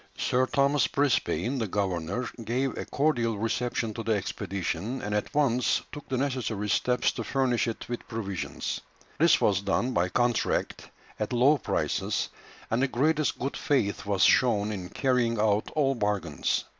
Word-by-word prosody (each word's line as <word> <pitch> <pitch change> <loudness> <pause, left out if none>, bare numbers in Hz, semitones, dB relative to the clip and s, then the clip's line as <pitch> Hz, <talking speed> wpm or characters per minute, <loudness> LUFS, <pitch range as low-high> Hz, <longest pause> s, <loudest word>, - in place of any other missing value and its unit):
] - - -32
Sir 130 +1 +1
Thomas 140 0 +2
Brisbane, 140 -2 0
the 110 - -1
governor, 95 +3 -2 0.2
gave 125 +4 -1
a - - -4
cordial 120 -7 +1
reception 115 +1 -1
to 115 - -5
the 115 0 +1
expedition, 100 +2 -3
and 105 +1 -4
at 105 - -1
once 125 -4 +2
took 145 - -9
the 130 - 0
necessary 125 -6 -2
steps 125 +3 +2
to - - -5
furnish 130 -4 +1
it 115 - -5
with 120 0 -5
provisions. 100 -6 -4 0.4
This 165 +1 +5
was 100 -2 +2
done 100 +6 0
by 90 -6 +1
contract 120 +2 0 0.3
at 105 - -2
low 135 +5 +4
prices, - - -1 0.4
and 115 +3 +2
the 135 - +3
greatest 150 +4 +1
good 135 +2 -3
faith 110 -9 0
was 100 -2 +2
shown 110 -4 +4
in 95 -4 -5
carrying 125 -4 +1
out 105 0 +2
all 140 -3 +3
bargains. 105 - -1
115 Hz, 160 wpm, -28 LUFS, 105-130 Hz, 0.4 s, This